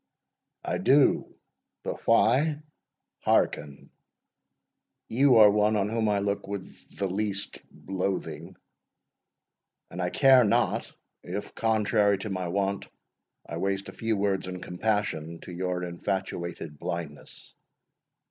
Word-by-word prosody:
"I - - -1
do; - - +4 0.5
but - - -6
why? 145 +7 +3 0.6
Hearken. 70 -1 0 1.2
You 130 +2 +4
are 105 -2 +8
one 105 +1 +2
on 100 0 +1
whom 110 -1 0
I 105 - +2
look 100 0 -2
with 100 -2 -4 0.3
the 100 - -1
least 100 +1 -2 0.3
loathing, 95 0 -3 1.4
and 90 - -5
I 90 - 0
care 130 +3 +6
not, 100 - +1 0.3
if, 95 +4 -6
contrary 105 -2 +2
to 100 +2 -5
my 95 -2 -2
wont, 100 +2 -1 0.6
I 85 - -6
waste 95 +2 -2
a - - -10
few 115 -1 -1
words 100 -2 0
in 90 0 -5
compassion 90 -5 -2
to - - -9
your 90 0 -2
infatuated 85 -3 -4
blindness. 80 -4 -6
100 Hz, 120 wpm, -27 LUFS, 90-110 Hz, 1.4 s, are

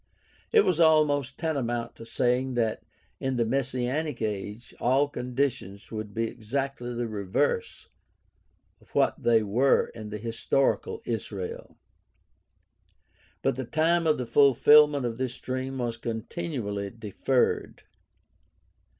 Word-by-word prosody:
It 440 -2 +5
was 170 - +1
almost 150 -4 +3
tantamount 120 -7 -2
to 115 - -10
saying 125 +2 0
that, 115 -2 0 0.4
in 130 -1 -1
the 120 -1 +1
messianic 130 +3 -1
age, 105 +1 -4
all 135 +4 +3
conditions 125 -6 -3
would 110 -2 -5
be 115 +2 -1
exactly 125 +2 -3
the 120 0 -2
reverse 100 -4 -1 0.9
of - - -23
what - - +2
they 115 -2 +4
were 120 +7 +3
in 110 -2 -9
the 105 - -5
historical 115 +5 0
Israel. 100 -5 -5 1.7
But - - +1
the 130 - -2
time 165 +5 +2
of 155 - +3
the 125 - -3
fulfilment 145 +3 +5
of 115 0 -3
this 130 -1 -3
dream 130 +1 -4
was 120 -2 -2
continually 115 -3 -4
deferred. 115 +4 -1
125 Hz, 120 wpm, -27 LUFS, 115-140 Hz, 1.7 s, It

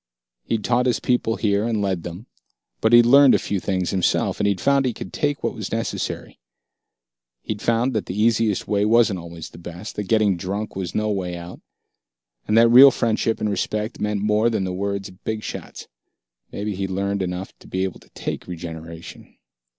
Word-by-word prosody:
He'd 110 -2 -1
taught 125 +3 +2
his 125 - +1
people 120 -2 0
here, 100 -2 +1
and 115 -2 0
led 95 -4 -1
them; 85 +6 -8 0.6
but 110 - +3
he'd 120 0 +8
learned 135 +2 +7
a - - +5
few 100 - -2
things 95 -1 -1
himself 95 -2 +1
he'd 100 -2 +1
found 140 -1 +2
he 120 - -2
could - - -8
take 145 -1 -1
what - - 0
was - - -6
necessary. - - -4 1.0
He'd 105 -1 -4
found 120 +3 +1
that 110 - -2
the 95 +3 -4
easiest 110 -2 +2
way 100 -1 +1
wasn't 110 -3 +3
always 85 -1 -9
the - - -12
best, 90 +4 -8
that 105 - -2
getting 105 -3 +2
drunk 100 +5 -4
was 95 -2 -4
no 110 0 0
way 90 -3 -3
out, 85 +1 -10 0.9
and 105 - +2
that 115 0 +6
real 130 +4 +10
friendship 115 -2 0
and 105 - -1
respect 105 +2 -3
meant 105 -1 -1
more 105 +2 +3
than 110 -4 -1
the 95 -1 -3
words 100 +1 -3
of 90 0 -19
big 110 -1 -3
shots. - - -7 0.6
Maybe 105 +1 -3
he'd 95 0 -3
learned 100 +1 -1
enough 90 +1 -4
to - - -16
be 95 0 -2
able 95 -2 -4
to - - -22
take - - -5
regeneration.... 80 -1 -9
105 Hz, 195 wpm, -22 LUFS, 95-115 Hz, 1.0 s, real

